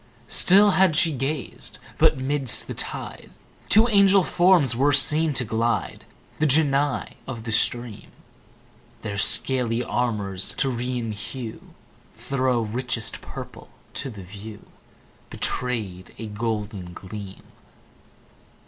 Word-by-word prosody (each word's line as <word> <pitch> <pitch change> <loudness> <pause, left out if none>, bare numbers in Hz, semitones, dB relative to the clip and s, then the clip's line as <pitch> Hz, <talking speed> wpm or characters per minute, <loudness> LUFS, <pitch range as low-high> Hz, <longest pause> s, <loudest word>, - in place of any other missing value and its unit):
Still 200 +9 +6
had 185 -4 +3
she 160 0 +3
gazed; 135 +1 -4 0.2
but - - +4
'midst 135 -1 +1
the - - -6
tide - - -5 0.4
Two 220 +3 +6
angel 200 -3 +5
forms 175 -9 +3
were 140 +4 +3
seen 155 +2 +4
to 125 - 0
glide, 115 +2 -2 0.3
The 155 - +2
Genii 145 -1 +1
of 120 -4 -6
the 115 - -5
stream: 120 0 -1 0.9
Their 100 -2 -4
scaly 120 +2 +3
armour's 105 -6 -1
Tyrian 125 -3 -2
hue 110 +2 -8 0.4
Thro' 130 -3 -1
richest 115 +1 -3
purple - - -10 0.2
to 135 - -5
the 105 -5 -10
view 105 +3 -11 0.6
Betray'd 105 -8 -4
a 115 - -7
golden 105 -4 -4
gleam. 95 +1 -9
125 Hz, 110 wpm, -24 LUFS, 110-145 Hz, 0.9 s, Still